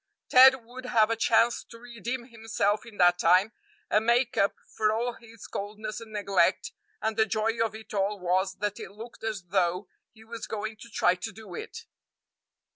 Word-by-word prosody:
Ted 260 -1 +7
would 255 +2 -10
have 225 -3 +3
a - - +2
chance 230 +1 +3
to 230 - -14
redeem 240 +1 -6
himself 220 -2 -1
in 220 -3 -13
that 175 0 +5
time 185 +6 +4 0.4
and 210 - +2
make 240 +1 +3
up 200 0 +2
for 215 -1 0
all 235 +3 -1
his 230 -2 -14
coldness 215 +2 -6
and 225 -1 -11
neglect; 200 -3 +1 0.3
and 220 0 -1
the 220 - +4
joy 225 +2 0
of 220 -1 -3
it 220 0 -11
all 200 0 0
was 185 +2 0
that 205 +1 -3
it - - -7
looked 220 +4 -12
as 215 -4 -3
though 180 0 0 0.2
he 220 0 -18
was 225 0 -7
going 220 0 -4
to 235 - -13
try 180 -4 +3
to 185 +5 -6
do 210 -3 -12
it. - - -8
220 Hz, 190 wpm, -28 LUFS, 200-230 Hz, 0.4 s, Ted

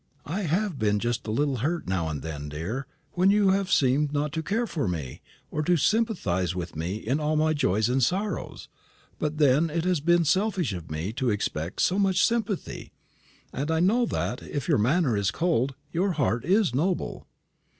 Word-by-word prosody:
"I 170 +7 -3
have 180 -1 -1
been 105 -1 +2
just 120 +1 -2
a - - -1
little 140 +3 0
hurt 160 +8 -1
now 90 -4 -1
and 75 -4 -5
then, 75 -2 -5
dear, 90 - -4 0.2
when 180 +3 +3
you 200 -1 +4
have 195 0 0
seemed 140 0 +3
not 145 0 -1
to 160 - -1
care 220 +8 -1
for 155 - -2
me, 75 -8 -4 0.3
or 155 - -1
to 175 +3 +2
sympathise 140 - +1
with 90 -2 -5
me 85 +5 -3
in 120 +7 -1
all 155 0 0
my 155 +1 +2
joys 110 -7 +1
and 130 +2 +1
sorrows; 195 - -2 0.5
but 150 0 -2
then 150 +2 +4
it 160 +1 -1
has 180 -3 +2
been 170 +3 +3
selfish 185 - +1
of 85 -3 -7
me 80 +7 -3
to 125 +1 0
expect 90 -5 -2
so 190 +3 +2
much 190 -2 +3
sympathy, 225 -5 -2 0.6
and 140 +4 -3
I 160 0 +1
know 225 +8 +3
that, 125 - -2
if 140 -5 -5
your - - +3
manner 135 +2 +2
is 100 -1 +1
cold, 140 -5 0 0.2
your 185 +3 +1
heart 130 -5 0
is 190 - +3
noble." 170 +7 -1
145 Hz, 190 wpm, -26 LUFS, 110-180 Hz, 0.6 s, you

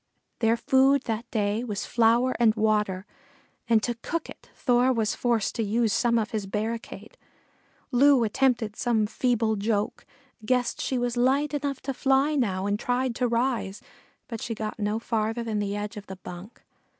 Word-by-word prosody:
Their 225 0 +3
food 265 +2 +3
that 230 +1 -4
day 210 +1 0
was 210 -5 -4
flour 235 +2 +3
and 225 -2 +4
water, 210 -3 0 0.6
and 225 -2 +3
to 240 - 0
cook 335 0 -3
it - - -15
Thor 250 0 +3
was 225 -4 0
forced 235 -4 0
to 230 - -1
use 220 +1 +1
some 235 +3 +2
of 220 -1 -1
his 210 -3 -3
barricade. 225 - -5 0.7
Loo 270 0 +5
attempted 230 -1 +1
some 230 -3 +1
feeble 225 0 0
joke, 215 +3 -2 0.4
guessed 245 +2 0
she 260 - -1
was 245 0 -1
light 275 +4 +2
enough 280 -2 -2
to 270 - -3
fly 270 +3 +2
now 195 -9 0
and 205 +1 0
tried 250 +1 0
to 250 - +1
rise, 235 -4 -1 0.5
but 230 -3 -6
she 230 - -3
got 215 0 -5
no 210 +1 0
farther 225 0 -2
than 220 -2 -2
the 205 0 -2
edge 205 +2 -4
of 205 - -9
the 190 - -7
bunk. 185 +3 -11
230 Hz, 175 wpm, -26 LUFS, 215-250 Hz, 0.7 s, Loo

